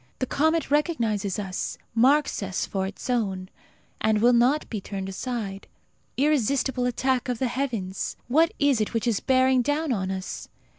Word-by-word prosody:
The - - -1
comet 315 +4 +1
recognizes 230 - 0
us, 195 -3 -3 0.2
marks 270 +5 +3
us 195 -1 -2
for 190 -1 -2
its 195 - -8
own, 195 -7 -1 0.5
and 215 -1 +2
will 240 +3 +5
not 250 +6 +3
be 215 -4 -4
turned 195 -1 -5
aside. 200 -1 -4 0.5
Irresistible 265 -2 +1
attack 255 +1 0
of 245 - -1
the 260 - 0
heavens! 235 -7 -3
What 320 +7 +4
is 285 -6 +3
it 215 - -2
which 230 - 0
is 230 -4 +1
bearing 260 -1 +3
down 290 +4 0
on 190 -4 -2
us? 190 0 -5
245 Hz, 160 wpm, -25 LUFS, 200-270 Hz, 0.5 s, will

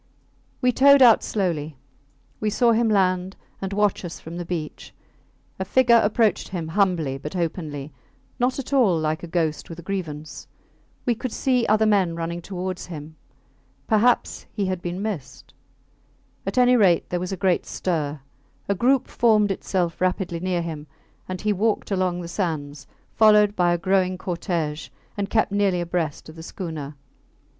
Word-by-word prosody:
We 250 -1 +4
towed 280 +2 +6
out 235 -3 +7
slowly. 160 -8 -2 0.6
We 215 - 0
saw 235 +3 +3
him 230 0 +2
land 185 -2 +1 0.3
and 195 0 -3
watch 205 -1 +1
us 175 -2 -7
from 165 +2 -8
the 175 - -4
beach. 165 -3 -6 0.6
A - - 0
figure 235 +3 +4
approached 215 +1 +1
him 170 -4 -5
humbly 165 -7 +1
but 150 +5 -7
openly 155 -5 -4 0.5
not 250 +1 +1
at 275 0 -5
all 225 -11 +4
like 155 0 -1
a 175 - -7
ghost 165 -2 -1
with 165 - -8
a 170 - -10
grievance. 155 -6 -5 0.6
We 245 - +3
could 250 +1 -5
see 250 -1 +1
other 215 +1 +3
men 195 -6 +2
running 170 +1 -4
towards 185 0 -5
him. 155 -2 -8 0.7
Perhaps 225 +3 +2
he 205 -3 -2
had 185 -2 -2
been 175 +3 -4
missed? 130 - -6 0.9
At 195 - -3
any 250 0 +5
rate 190 -7 +3
there 180 - 0
was 180 +1 -4
a 190 - -3
great 180 -1 +1
stir. 155 -5 -2 0.5
A 200 - +2
group 250 +6 +2
formed 215 -3 +3
itself 180 -3 -2
rapidly 185 -2 0
near 180 -1 -1
him, 155 -3 -6 0.4
and 185 0 -4
he 210 0 +1
walked 215 +2 0
along 185 -2 0
the 170 - -6
sands, 155 -6 -4 0.3
followed 210 -1 +5
by 175 -1 +3
a 175 - +2
growing 185 +1 +1
cortege 170 -4 -3 0.3
and 200 -1 -3
kept 220 -1 +1
nearly 200 -3 +1
abreast 170 -3 -3
of 155 - -11
the - - -8
schooner. 160 -4 -6
185 Hz, 165 wpm, -23 LUFS, 165-210 Hz, 0.9 s, out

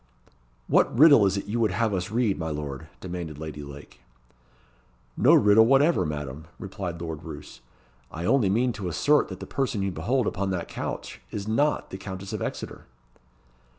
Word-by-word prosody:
"What - - +3
riddle 140 -8 +8
is 95 +1 0
it 100 - -4
you 110 +3 -2
would 110 -2 +3
have 110 +3 0
us 90 -2 -2
read, 110 -3 0
my 80 -1 -2
lord?" 75 0 -5
demanded 85 -5 -6
Lady 75 -1 -7
Lake. 70 0 -11 1.2
"No - - +5
riddle 105 +2 +6
whatever, 135 - +4
Madam," 75 0 -5
replied 95 -4 -6
Lord 80 -3 -5
Roos. - - -10 0.5
"I 85 +2 -5
only 120 -3 +3
mean 120 +5 +1
to 100 -4 -5
assert 145 - +3
that 95 -1 -8
the - - -7
person 130 -7 -2
you 95 - -1
behold 115 +10 0
upon 100 0 -1
that 90 -3 -3
couch - - -6
is 100 0 -5
not 145 +7 +1
the 95 - -6
Countess 95 0 -7
of - - -3
Exeter." - - -6
95 Hz, 175 wpm, -26 LUFS, 80-115 Hz, 1.2 s, riddle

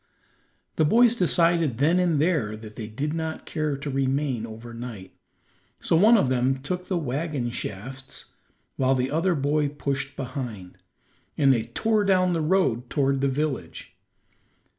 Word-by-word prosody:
The - - +4
boys 230 +9 +5
decided 170 - +2
then 160 +7 +3
and 170 -5 +2
there 145 -10 0
that 110 -1 -11
they 110 -3 -6
did 140 +8 -3
not 160 -1 -4
care 155 -3 -2
to 140 +1 -5
remain 135 -3 -1
over 115 +1 -10
night, 115 -5 -8 0.7
so - - +1
one 215 +8 +6
of 195 - +2
them 130 +1 +1
took 180 +7 -5
the 185 - 0
wagon 145 -3 -2
shafts, 130 +6 -6 0.5
while 135 0 +2
the 130 +1 -1
other 170 +4 +1
boy 145 +1 +1
pushed 140 -1 -3
behind, 125 -9 -6 0.6
and 135 -2 +5
they 115 -3 -1
tore 215 - 0
down 185 -2 +3
the 165 - 0
road 150 -8 +1
toward 135 -2 +1
the 140 - +2
village. 135 - -4
140 Hz, 155 wpm, -25 LUFS, 125-165 Hz, 0.7 s, one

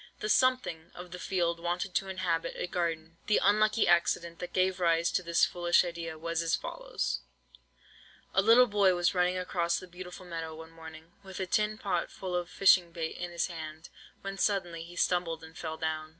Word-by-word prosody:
The 215 - -3
'something' 255 -10 +2
of 180 0 -9
the 180 - -7
field 170 -3 0
wanted 175 +2 -2
to 195 - 0
inhabit 180 -3 -1
a - - -2
garden. 165 -2 -3
The 210 - +4
unlucky 215 +2 +3
accident 170 -1 +2
that 180 0 -6
gave 185 0 +1
rise 170 -1 +2
to - - +1
this 170 -1 +3
foolish 175 0 +2
idea, 170 -2 -5
was 165 +1 -2
as 165 -1 +1
follows:— 65 0 -3 1.1
"A 190 - +4
little 230 +5 +7
boy 200 -4 +3
was 175 +1 +2
running 180 0 +2
across 170 -2 0
the - - -7
beautiful 180 +1 -10
meadow 165 -2 -5
one 160 +1 -11
morning, 160 0 -12
with 190 -1 -9
a 190 - -1
tin 210 +3 +1
pot 185 -5 -1
full 185 -2 -5
of 175 0 -2
fishing 185 -3 +5
bait 165 -1 -4
in 175 - -5
his 170 -1 -1
hand, 160 -2 -8 0.3
when 195 0 -6
suddenly 175 -5 0
he 170 +1 -10
stumbled 170 -2 0
and 160 0 -12
fell 160 -1 -5
down. 155 -1 -3
175 Hz, 195 wpm, -30 LUFS, 165-185 Hz, 1.1 s, little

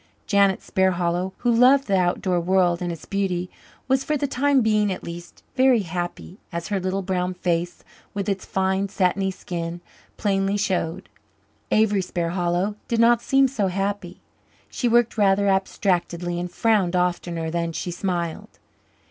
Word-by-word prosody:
Janet 200 -3 +3
Sparhallow, 180 -1 0
who 240 - +1
loved 255 +4 +5
the 200 - +1
outdoor 180 0 +1
world 175 0 +2
and 175 -1 -2
its 165 -2 -8
beauty, 185 -3 -2 0.4
was, 265 0 +2
for 300 - 0
the 285 - -1
time 275 0 +2
being 215 -2 +2
at 185 - -5
least, 170 +1 -9
very 255 -3 +4
happy, 175 +1 -5
as 170 +1 -5
her 200 -2 0
little 190 +1 -2
brown 180 -1 -1
face, 175 -1 -2 0.3
with 200 0 -2
its 195 -2 -1
fine, 190 +1 0
satiny 190 0 +1
skin, 175 -2 -5 0.4
plainly 195 -1 0
showed. 185 -3 -2 0.6
Avery 210 -2 +3
Sparhallow 175 +3 -1
did 235 - 0
not 235 0 +5
seem 270 +2 +3
so 230 -7 -1
happy. 195 -1 -3 0.5
She 245 - -1
worked 235 -1 +2
rather 200 0 +3
abstractedly 180 -3 0
and 175 0 -4
frowned 200 -4 +2
oftener 175 -2 -1
than 170 0 -1
she 175 +2 -4
smiled. 175 -2 -4
190 Hz, 150 wpm, -23 LUFS, 175-205 Hz, 0.6 s, loved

